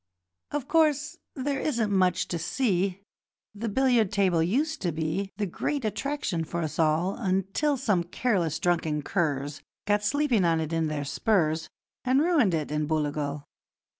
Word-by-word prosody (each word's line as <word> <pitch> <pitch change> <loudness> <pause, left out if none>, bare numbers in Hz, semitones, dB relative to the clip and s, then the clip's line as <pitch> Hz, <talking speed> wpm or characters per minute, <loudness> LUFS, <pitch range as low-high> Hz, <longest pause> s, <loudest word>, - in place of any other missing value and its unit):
'Of 285 -2 -3
course, 315 0 +2 0.2
there 275 0 -1
isn't 230 -8 0
much 185 -2 +2
to 170 - -2
see 195 -1 0 0.5
The 220 +2 -4
billiard 240 -3 +3
table 185 -5 +2
used 290 - 0
to 175 - 0
be 165 +5 -2
The 210 - 0
great 255 - -2
attraction 215 - -2
for 170 +2 -3
us 155 - -4
all, 160 +4 +2
Until 195 +8 0
some 205 -9 +1
careless, 175 - 0
drunken 160 -4 0
curs 145 -5 -1 0.2
Got 205 0 +2
sleeping 260 -2 +2
on 165 -1 +3
it 160 0 -3
in 165 -1 +1
their 150 -2 -3
spurs, 160 0 +1 0.3
And 260 +1 +3
ruined 295 - +3
it, 150 -2 -3
in 150 0 -1
Booligal. 150 -2 -1
190 Hz, 155 wpm, -27 LUFS, 160-250 Hz, 0.5 s, billiard